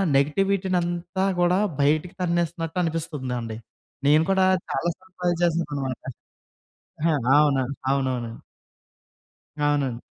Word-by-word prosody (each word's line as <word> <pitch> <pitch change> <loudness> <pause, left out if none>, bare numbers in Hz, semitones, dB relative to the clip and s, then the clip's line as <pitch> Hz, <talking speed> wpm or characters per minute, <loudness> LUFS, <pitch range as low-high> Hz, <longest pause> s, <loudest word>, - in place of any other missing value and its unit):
నెగటివిటీ‌నంతా 180 +3 +1 0.2
కూడా 180 +2 +3 0.2
బయటికి 155 +5 +1
తన్నేస్తున్నట్టు 170 -1 -1
అనిపిస్తుందండి. 130 -8 -3 0.5
నేను 155 +2 +6
కూడా 190 -1 +4 0.2
చాలాసార్లు 180 +2 -3
ట్రై 175 -1 +2
చేశానన్నమాట. 145 -6 -1 1.0
ఆహా! 160 -1 +2 0.3
అవును. 135 -3 +2 0.3
అవునవును. 130 -4 -1 1.4
అవునండి. 135 -5 0
160 Hz, 85 wpm, -24 LUFS, 140-175 Hz, 1.4 s, నేను